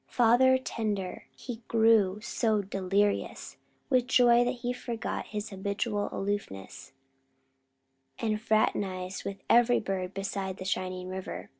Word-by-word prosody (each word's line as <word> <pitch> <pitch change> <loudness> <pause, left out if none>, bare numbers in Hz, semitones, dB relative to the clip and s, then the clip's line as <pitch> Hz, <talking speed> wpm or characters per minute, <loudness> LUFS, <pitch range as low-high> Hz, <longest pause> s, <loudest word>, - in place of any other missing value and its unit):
Father 250 +2 +5
tender, 210 -7 -3
he 245 -3 -7
grew 220 -3 +3
so 220 -2 0
delirious 195 +1 -1 0.3
with 255 -2 +2
joy 245 -1 +5
that 245 +1 -1
he 245 - 0
forgot 235 -2 -4
his 210 0 -5
habitual 200 +2 -2
aloofness, 195 - -4 1.3
and 215 -2 -1
fraternized 195 -4 0
with 200 0 -6
every 240 +1 +5
bird 190 -2 -3
beside 195 -1 -3
the 185 - -7
shining 185 -1 -2
river. 185 0 -6
205 Hz, 120 wpm, -29 LUFS, 190-235 Hz, 1.3 s, Father